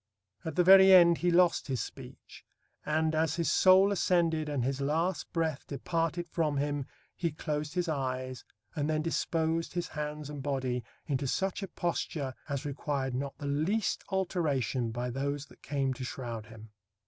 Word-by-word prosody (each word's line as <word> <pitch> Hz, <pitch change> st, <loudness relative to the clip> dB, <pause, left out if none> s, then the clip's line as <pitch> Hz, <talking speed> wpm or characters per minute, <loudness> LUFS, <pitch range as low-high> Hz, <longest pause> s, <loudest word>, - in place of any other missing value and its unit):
At 160 Hz, -3 st, -5 dB
the 180 Hz, -, +4 dB
very 190 Hz, +1 st, +8 dB
end 170 Hz, -2 st, +7 dB
he 175 Hz, -, +2 dB
lost 175 Hz, 0 st, +3 dB
his 130 Hz, -3 st, -1 dB
speech, -, -, -9 dB, 0.4 s
and 155 Hz, +1 st, +1 dB
"as 160 Hz, -1 st, +1 dB
his 170 Hz, -2 st, 0 dB
soul 190 Hz, +2 st, +6 dB
ascended 165 Hz, -5 st, +1 dB
and 140 Hz, -4 st, -1 dB
his 135 Hz, +1 st, -1 dB
last 165 Hz, +6 st, -1 dB
breath 160 Hz, -4 st, -2 dB
departed 165 Hz, +4 st, -2 dB
from 155 Hz, -4 st, 0 dB
him 145 Hz, -1 st, -1 dB, 0.3 s
he 170 Hz, -2 st, -1 dB
closed 150 Hz, +1 st, -4 dB
his 180 Hz, -1 st, 0 dB
eyes, 130 Hz, -4 st, -3 dB, 0.3 s
and 145 Hz, 0 st, -1 dB
then 155 Hz, 0 st, 0 dB
disposed 165 Hz, 0 st, -1 dB
his 175 Hz, -, -2 dB
hands 150 Hz, -1 st, -5 dB
and 145 Hz, -1 st, -6 dB
body 130 Hz, -3 st, -2 dB, 0.2 s
into 135 Hz, -1 st, -1 dB
such 190 Hz, +9 st, -1 dB
a 195 Hz, -, -4 dB
posture 160 Hz, -6 st, -3 dB, 0.2 s
as 140 Hz, +1 st, -3 dB
required 140 Hz, -2 st, -2 dB
not 135 Hz, +2 st, -4 dB
the 145 Hz, -, -7 dB
least 160 Hz, +10 st, 0 dB
alteration 150 Hz, -, 0 dB
by 120 Hz, +2 st, -3 dB
those 140 Hz, +2 st, -2 dB
that -, -, -20 dB
came 135 Hz, -2 st, -1 dB
to 130 Hz, -, -7 dB
shroud 120 Hz, -3 st, -5 dB
him." 110 Hz, -1 st, -13 dB
150 Hz, 170 wpm, -30 LUFS, 135-170 Hz, 0.4 s, very